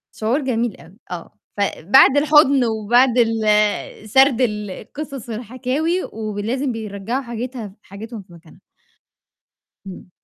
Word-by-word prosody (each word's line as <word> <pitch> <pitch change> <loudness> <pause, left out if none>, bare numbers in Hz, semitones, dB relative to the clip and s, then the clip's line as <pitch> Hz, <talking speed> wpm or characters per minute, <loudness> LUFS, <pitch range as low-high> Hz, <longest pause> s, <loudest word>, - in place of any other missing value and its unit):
شعور 230 +7 0
جميل 240 -4 -1
أوي، 175 +4 -17 0.2
آه، 175 -2 -7 0.2
فبعد 205 - +4
الحُضن 285 -3 +5
وبعد 235 +3 +2
ال 215 -2 +1
سرد 265 +1 +4
القصص 230 +5 -4
الحكاوي 255 - -2
ولازم 225 +5 -3
بيرجّعوا 220 +3 -4
حاجتها 235 -3 -6
حاجتهم 215 +3 -9
في 185 -2 -19
مكانها. 170 +1 -17 1.3
إمم. 185 -1 -10
225 Hz, 105 wpm, -20 LUFS, 210-260 Hz, 1.3 s, الحُضن